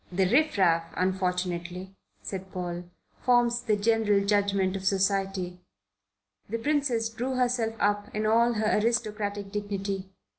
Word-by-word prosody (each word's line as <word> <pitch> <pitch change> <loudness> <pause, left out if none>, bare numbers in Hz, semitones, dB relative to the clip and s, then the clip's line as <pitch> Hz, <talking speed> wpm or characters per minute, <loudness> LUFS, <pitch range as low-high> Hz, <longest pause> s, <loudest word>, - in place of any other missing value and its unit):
"The 190 +1 +2
riff 300 +6 +3
raff, 165 -3 +2
unfortunately," 180 0 -2 0.3
said 190 -1 -6
Paul, 175 -1 -4 0.4
"forms 240 -1 +3
the 220 -3 +1
general 210 -1 +2
judgment 200 -2 +1
of 190 - -4
society." 195 -2 0 0.9
The 230 - -1
Princess 255 -3 +1
drew 245 +4 -3
herself 245 -3 +1
up 205 0 +1
in 215 0 -1
all 230 +2 +4
her 215 -1 +1
aristocratic 210 -3 -1
dignity. 200 -2 -3
205 Hz, 125 wpm, -27 LUFS, 190-225 Hz, 0.9 s, all